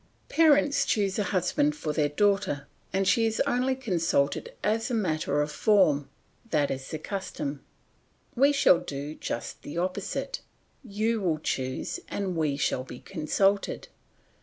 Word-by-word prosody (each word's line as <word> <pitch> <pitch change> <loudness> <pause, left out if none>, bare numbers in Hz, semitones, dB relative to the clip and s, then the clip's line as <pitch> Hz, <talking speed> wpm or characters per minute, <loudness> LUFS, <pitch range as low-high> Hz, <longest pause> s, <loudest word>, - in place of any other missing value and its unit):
Parents 295 -3 +4
choose 200 -1 0
a 205 - +1
husband 285 - +1
for 155 - -3
their 150 -1 +1
daughter 195 -4 +1 0.2
and 195 0 +1
she 225 +1 +4
is 225 - -2
only 255 +2 +1
consulted 170 - 0
as 225 +3 +1
a 245 - 0
matter 155 -7 0
of 150 - -4
form; 150 -8 +3 0.4
that 150 -5 +1
is 135 0 -5
the 155 - -3
custom. 150 -6 -5 0.7
We 275 +3 +5
shall 275 -11 +5
do 145 -2 -5
just 120 - -5
the 145 - -7
opposite; 185 - -2 0.4
you 220 0 -1
will 170 -5 +1
choose, 130 -3 -3
and 190 -3 -3
we 150 -4 0
shall 130 -2 0
be 125 -1 -10
consulted. 195 +4 0
185 Hz, 145 wpm, -27 LUFS, 150-220 Hz, 0.7 s, We